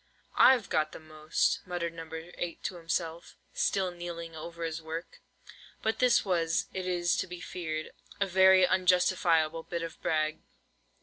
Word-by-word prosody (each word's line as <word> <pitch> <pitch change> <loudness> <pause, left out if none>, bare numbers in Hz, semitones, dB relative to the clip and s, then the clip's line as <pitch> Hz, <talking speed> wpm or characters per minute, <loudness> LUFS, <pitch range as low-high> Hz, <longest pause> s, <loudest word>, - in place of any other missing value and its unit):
"I've 255 -5 +6
got 155 0 0
the - - -8
most," 155 0 0
muttered 170 -2 -3
No. 165 -1 -8
8 170 +1 -6
to - - -2
himself, 165 0 -3 0.2
still 190 -2 +1
kneeling 170 -1 -7
over 170 +2 -7
his 165 0 -3
work. 160 +2 -7 0.6
But 220 0 0
this 250 -3 +4
was, 170 0 +1
it 185 -1 -4
is 175 -1 +1
to - - -1
be 180 0 -8
feared, 160 -4 -5 0.3
a 200 - +3
very 190 0 +6
unjustifiable 180 -3 +2
bit 170 +1 -4
of 165 -1 -7
brag. 155 0 0
170 Hz, 150 wpm, -30 LUFS, 160-185 Hz, 0.6 s, I've